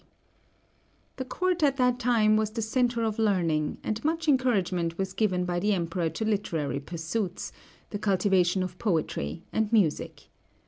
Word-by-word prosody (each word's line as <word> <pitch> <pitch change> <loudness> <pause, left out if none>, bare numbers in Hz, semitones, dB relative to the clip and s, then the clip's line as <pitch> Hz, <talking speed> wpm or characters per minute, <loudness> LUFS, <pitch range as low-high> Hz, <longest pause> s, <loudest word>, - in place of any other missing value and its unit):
D.). - - -33 1.1
The 260 - -3
court 360 +6 -1
at 280 -2 +3
that 250 -1 +2
time 225 -3 +3
was 215 -1 +1
the 225 +1 -4
centre 240 +1 +1
of 220 -1 -1
learning, 170 -8 +1
and 215 +1 -3
much 325 +1 -1
encouragement 190 - +1
was 190 -1 -2
given 185 -5 +1
by 175 -1 -1
the 210 +3 +2
Emperor 170 -2 -1
to 165 +8 -4
literary 165 - -1
pursuits, 170 +6 -4 0.4
the 205 - -3
cultivation 190 -2 +2
of 185 0 -6
poetry, 155 - -1
and 220 -1 0
music. 195 -10 0
205 Hz, 155 wpm, -27 LUFS, 175-230 Hz, 1.1 s, at